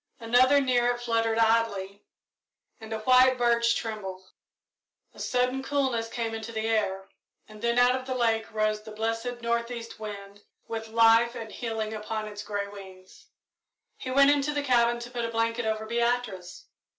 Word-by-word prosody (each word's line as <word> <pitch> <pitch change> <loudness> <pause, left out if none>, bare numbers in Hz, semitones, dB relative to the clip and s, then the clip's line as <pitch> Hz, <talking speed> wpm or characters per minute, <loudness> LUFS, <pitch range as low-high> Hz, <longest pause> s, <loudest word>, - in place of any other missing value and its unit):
Another 250 +4 +4
near 250 -3 +2
it 245 0 0
fluttered 230 -2 0
idly, 220 -3 +1 0.8
and 220 -1 -11
a 220 -1 -3
white 255 +2 +5
birch 235 -1 +2
trembled. 195 -5 -5 0.9
A - - -16
sudden 250 +1 0
coolness 265 -5 -1
came 230 -1 -3
into 225 +1 -6
the 220 -1 -3
air, 195 -4 -1 0.4
then 235 +3 -2
out 245 +1 +5
of 260 0 -6
the 260 - -2
lake 225 -2 0
rose 215 -1 0
the 215 - -12
blessed 225 +3 -3
north 235 0 0
east 230 -2 -8
wind, 205 -1 -8 0.3
with 225 -1 -5
life 230 +1 +4
and 225 -2 -7
healing 220 -2 -4
upon 215 0 -4
its 205 -1 -7
grey 205 -1 -3
wings. 190 -2 -13 0.7
He 255 - -7
went 275 +2 +5
into 290 +1 +1
the 290 - -1
cabin 240 -3 +3
to 240 +1 -8
put 240 -1 -3
a 230 - -2
blanket 230 0 -1
over 220 0 -2
Beatrice. 235 -5 -2
230 Hz, 165 wpm, -27 LUFS, 215-245 Hz, 0.9 s, white